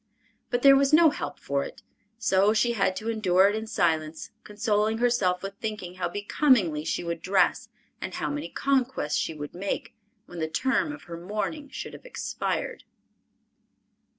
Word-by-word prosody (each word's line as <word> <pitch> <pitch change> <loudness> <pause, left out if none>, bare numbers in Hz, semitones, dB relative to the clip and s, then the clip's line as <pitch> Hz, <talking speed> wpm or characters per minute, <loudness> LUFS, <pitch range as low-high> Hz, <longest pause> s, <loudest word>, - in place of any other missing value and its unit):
But 245 0 -1
there 275 -1 +9
was 275 0 +3
no 320 -1 +7
help 145 - -5
for 140 0 -1
it, - - -10 0.3
so 200 -2 +3
she 240 +2 +3
had 195 -4 +1
to 215 +4 -4
endure 190 -4 +4
it 205 - -1
in 220 0 -4
silence, 160 -6 -1
consoling 210 0 0
herself 205 -7 +1
with 195 0 -4
thinking 210 -5 -4
how 185 - -2
becomingly 205 - +2
she 160 - -2
would 170 -1 -4
dress 190 0 +2 0.3
and - - -5
how - - -2
many 290 +1 -4
conquests 260 - 0
she 160 - -2
would 145 -1 -7
make, 195 +3 -4 0.3
when 175 - -9
the 160 - 0
term 260 - 0
of 295 -1 -9
her 170 -1 -8
mourning 210 - -4
should - - -7
have - - -11
expired! - - -3
205 Hz, 170 wpm, -27 LUFS, 175-245 Hz, 0.3 s, there